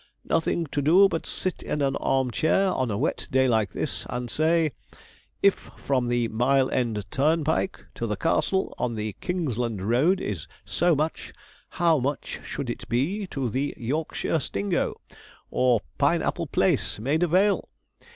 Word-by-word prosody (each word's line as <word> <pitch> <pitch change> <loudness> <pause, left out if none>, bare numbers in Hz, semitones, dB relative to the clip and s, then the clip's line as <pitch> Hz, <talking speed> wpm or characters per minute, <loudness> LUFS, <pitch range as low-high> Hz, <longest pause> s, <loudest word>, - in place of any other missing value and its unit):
Nothing 165 +1 +1
to 145 - 0
do 175 +8 +6
but 165 -4 -3
sit 185 - -3
in 150 - -3
an 135 0 +1
arm 130 -2 +1
chair 185 - +2
on 130 -6 0
a 100 - -1
wet 145 +8 -1
day 130 0 +3
like 110 -4 +2
this, - - -4
and 120 -1 -4
say, 160 0 +2 0.7
If 200 -1 +7
from 130 -3 -3
the 120 -1 +1
Mile 130 +4 +2
End 115 -5 -1
turnpike 160 +5 +1
to 115 - -3
the 105 - -1
"Castle" 190 - 0
on 120 -2 -1
the 105 -1 -4
Kingsland 120 - -2
Road 150 - +3
is 95 -7 -4 0.2
so 175 -1 +2
much, 155 +3 -2 0.4
how 165 -3 +2
much 140 +3 -3
should 125 -4 -4
it 120 - -8
be 170 - 0
to 135 -7 -2
the 135 +6 -2
"Yorkshire 150 +5 -1
Stingo," 100 -7 -1 0.5
or 125 -4 +3 0.2
Pine - - +3
Apple - - -1
Place, - - +1
Maida 150 +10 +1
Vale? 195 +5 +2
135 Hz, 160 wpm, -26 LUFS, 120-165 Hz, 0.7 s, If